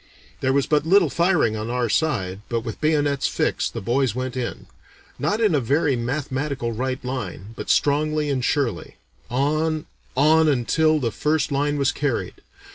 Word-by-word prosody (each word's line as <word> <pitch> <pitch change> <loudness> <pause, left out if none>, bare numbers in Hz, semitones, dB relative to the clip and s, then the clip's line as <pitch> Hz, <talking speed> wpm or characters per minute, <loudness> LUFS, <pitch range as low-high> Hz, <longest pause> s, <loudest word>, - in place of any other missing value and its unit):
There 130 - +1
was 140 0 +2
but 150 -1 +2
little 175 -1 +4
firing 170 - +2
on 110 +1 -4
our 125 0 0
side, 100 -8 0
but 115 -1 -1
with 115 -1 -7
bayonets 145 -3 +1
fixed - - -1
the - - -3
boys 120 +2 0
went 130 0 -3
in, 125 -2 -4 0.5
not 210 - 0
in 215 -6 +3
a 145 - +3
very 140 +3 +1
mathematical 130 0 -2
right 130 +2 -3
line, 125 -5 -5
but - - -7
strongly 150 +1 +2
and 130 -2 -1
surely, 120 - -1 0.3
on, 155 +4 0 0.3
on, 155 +3 +5
until 155 +4 +2
the 120 -5 -1
first 150 +8 0
line 145 +1 0
was 140 -2 +2
carried. 140 -4 -2
140 Hz, 165 wpm, -23 LUFS, 125-155 Hz, 0.5 s, on